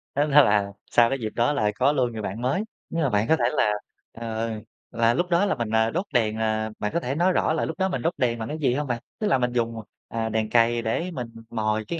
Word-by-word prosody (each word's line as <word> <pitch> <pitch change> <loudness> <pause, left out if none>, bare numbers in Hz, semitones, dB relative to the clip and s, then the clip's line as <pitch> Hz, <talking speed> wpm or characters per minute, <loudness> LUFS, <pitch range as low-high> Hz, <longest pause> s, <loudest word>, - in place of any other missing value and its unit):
Tức 145 - +3
là 105 -9 +4 0.2
sau 120 -1 +5
cái 135 - -2
dịp 110 -2 -3
đó 120 +5 +2
là 105 -8 +1
có 130 +5 +3
luôn 130 -4 +1
người 110 -1 -5
bạn 105 +3 -4
mới. 135 +11 0 0.3
Nhưng 165 -1 -1
mà 140 - +2
bạn 105 0 +1
có 160 - +5
thể 125 - -2
là, 105 - +3 0.4
ờ, 115 0 -4 0.4
là 115 0 +3
lúc 175 +8 -1
đó 175 +3 +3
là 195 - +1
mình, 120 -4 -3
ờ, 110 0 +2
đốt 180 +5 -1
đèn, 110 -3 +2
ờ, 110 0 0
bạn 105 - -2
có 170 - +2
thể 135 -3 -3
nói 175 +4 +3
rõ 155 - +2
là 160 - 0
lúc 160 - -5
đó 190 0 +2
mình 185 - -2
đốt 165 +2 0
đèn 120 -4 0
bằng 110 - -4
cái 150 - -4
gì 135 -5 +2
hông 145 +2 -2
bạn? 120 -1 -2 0.2
Tức 215 - 0
là 135 - +3
mình 125 -1 0
dùng, 115 -1 -1 0.3
à, 115 -1 -2
đèn 110 0 -1
cày 115 0 +3
để 165 +11 -2
mình 125 -8 -5 0.2
mồi 110 -1 -1
cái 170 - -3
120 Hz, 275 wpm, -25 LUFS, 110-150 Hz, 0.4 s, sau